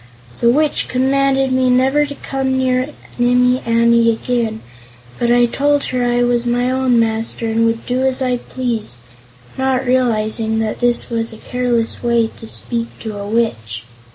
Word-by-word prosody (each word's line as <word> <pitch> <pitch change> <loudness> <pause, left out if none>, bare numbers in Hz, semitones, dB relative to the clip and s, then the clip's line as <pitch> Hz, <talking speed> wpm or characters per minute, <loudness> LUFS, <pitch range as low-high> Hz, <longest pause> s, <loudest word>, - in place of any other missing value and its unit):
The 235 - +3
Witch 295 +4 +1
commanded 270 +1 +1
me 255 0 +2
never 265 +4 +3
to 285 - -7
come 265 -1 -2
near 255 +1 0 0.3
Nimmie 250 +1 +3
Amee 230 0 +4
again, 225 -1 -2 0.6
but 235 - +1
I 245 0 +5
told 285 +4 +1
her 250 -1 0
I 245 0 +1
was 240 -1 +1
my 245 +1 0
own 260 -2 +2
master 225 +1 -1
and 225 +1 +2
would 230 0 -2
do 250 +1 -1
as 265 0 +1
I 250 -2 0
pleased, 240 - -4 0.6
not 265 0 0
realizing 225 -3 +1
that 220 -1 -2
this 240 0 +1
was 230 0 -2
a - - -10
careless 240 -1 -1
way 235 -2 +1
to 225 - -9
speak 230 +1 -3
to 220 -2 -5
a 200 0 -6
Witch. 115 - -2
245 Hz, 165 wpm, -17 LUFS, 230-255 Hz, 0.6 s, I